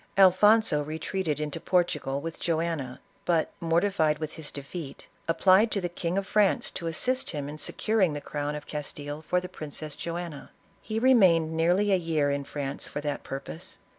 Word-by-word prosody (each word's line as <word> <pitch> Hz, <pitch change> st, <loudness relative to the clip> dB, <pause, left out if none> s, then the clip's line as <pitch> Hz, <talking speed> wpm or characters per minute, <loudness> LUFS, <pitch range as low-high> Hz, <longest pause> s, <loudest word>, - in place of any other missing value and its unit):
Alfonso 195 Hz, -3 st, +5 dB
retreated 160 Hz, +1 st, -2 dB
into 150 Hz, +1 st, -3 dB
Portugal 150 Hz, -6 st, 0 dB
with 165 Hz, +1 st, -6 dB
Joanna, 160 Hz, -6 st, -1 dB, 0.2 s
but 165 Hz, -3 st, +1 dB
mortified 165 Hz, -2 st, +2 dB
with 155 Hz, 0 st, -5 dB
his 160 Hz, -3 st, -7 dB
defeat, 140 Hz, +1 st, -7 dB, 0.2 s
applied 190 Hz, +6 st, +5 dB
to 205 Hz, -, 0 dB
the 175 Hz, -2 st, -2 dB
King 175 Hz, +1 st, -2 dB
of 195 Hz, -, 0 dB
France 205 Hz, 0 st, +2 dB
to 170 Hz, -, -4 dB
assist 255 Hz, +11 st, 0 dB
him 145 Hz, -3 st, -4 dB
in 150 Hz, +1 st, -7 dB
securing 195 Hz, -1 st, +1 dB
the 145 Hz, -, -3 dB
crown 145 Hz, 0 st, -3 dB
of 150 Hz, -1 st, -7 dB
Castile 145 Hz, 0 st, -5 dB
for 180 Hz, +3 st, +1 dB
the 180 Hz, -, -6 dB
Princess 155 Hz, -3 st, -6 dB
Joanna; 170 Hz, -3 st, -5 dB, 0.3 s
he 220 Hz, -, -4 dB
remained 190 Hz, -10 st, +5 dB
nearly 175 Hz, +6 st, +2 dB
a 190 Hz, -, +4 dB
•year 155 Hz, -4 st, +1 dB
in 140 Hz, 0 st, -2 dB
France 140 Hz, -1 st, -4 dB
for -, -, -4 dB
that 145 Hz, -1 st, -3 dB
purpose. 135 Hz, -, -5 dB
165 Hz, 170 wpm, -28 LUFS, 150-185 Hz, 0.3 s, Alfonso